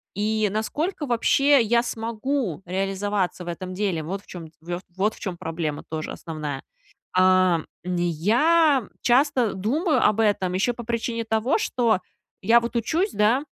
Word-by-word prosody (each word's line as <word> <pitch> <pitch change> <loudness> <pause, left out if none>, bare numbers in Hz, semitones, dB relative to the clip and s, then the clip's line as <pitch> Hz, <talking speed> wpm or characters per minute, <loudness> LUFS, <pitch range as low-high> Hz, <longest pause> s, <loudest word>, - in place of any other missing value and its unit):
И 215 +1 +1
насколько, 295 - -2
вообще, 275 +3 +4
я 235 +1 +2
смогу 225 - -3
реализоваться 195 0 -2
в - - -12
этом 185 +2 -5
деле. 190 -4 -1
Вот 195 +5 -4
в - - -28
чём 170 -3 -8
вт 175 +2 -5
вот 205 +3 +1
в - - -15
чём 185 -4 -5
проблема 160 -3 -4
тоже 155 0 -4
основная. 155 -4 -5 0.5
А, 185 -2 +4 0.2
м, 180 -1 -2
я 240 - +3
часто 255 -2 +3
думаю 290 - +1
об 215 - +2
этом, 200 -4 +1
еще 195 +6 +1
по 240 - -7
причине 230 0 -2
того, 225 - +1
что 240 - +1 0.4
я 230 +4 +6
вот 235 +1 -5
учусь, 330 - 0
да, 225 +7 +2
210 Hz, 155 wpm, -24 LUFS, 185-240 Hz, 0.5 s, я